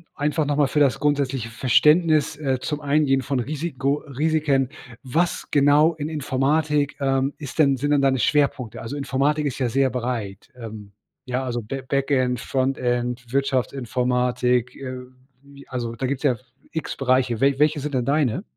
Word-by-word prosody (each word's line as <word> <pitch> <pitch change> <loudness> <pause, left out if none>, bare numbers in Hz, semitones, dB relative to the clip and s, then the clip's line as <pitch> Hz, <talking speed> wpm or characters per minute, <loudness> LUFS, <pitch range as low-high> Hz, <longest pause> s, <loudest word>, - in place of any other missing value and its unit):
einfach 150 +1 0
noch 145 0 -1
mal 145 -2 +4
für 150 - 0
das 135 -5 +3
grundsätzliche 135 -5 0
Verständnis, 150 +6 +3
äh, 135 -4 -1
zum 150 +2 -4
Eingehen 140 -2 +2
von 130 +1 -2
Risiko 140 +1 -2
Risiken: 145 -2 +1 0.3
Was 165 +7 -1
genau 145 +3 +4
in 150 0 -4
Informatik, 145 0 0
ähm, 135 0 +1
ist 140 -4 -8
denn 140 -3 +4
sind 145 +3 -1
denn 145 - +3
deine 135 -1 +2
Schwerpunkte? 135 -5 0
Also 115 +5 -6
Informatik 140 +2 0
ist 140 -1 -3
ja 125 - +1
sehr 135 +3 +2
breit. 120 -5 -4
Ähm, 110 -4 -9 0.3
ja, 125 +1 -2
also 120 -2 -3
Ba 110 +6 -5
Backend, 135 -3 +1
Frontend, 125 -2 -1
Wirtschaftsinformatik. 125 -2 0
Äh, 130 -2 -6 0.4
wie 140 0 -16
also 120 -3 -4
da 130 - -3
gibt's 135 +2 -2
ja 130 -4 +3 0.4
x 160 -3 -3
Bereiche. 130 -3 +1
We 140 0 +3
welche 150 0 +3
sind 145 0 -4
denn 125 -2 0
deine? 145 - +1
135 Hz, 160 wpm, -23 LUFS, 125-145 Hz, 0.4 s, mal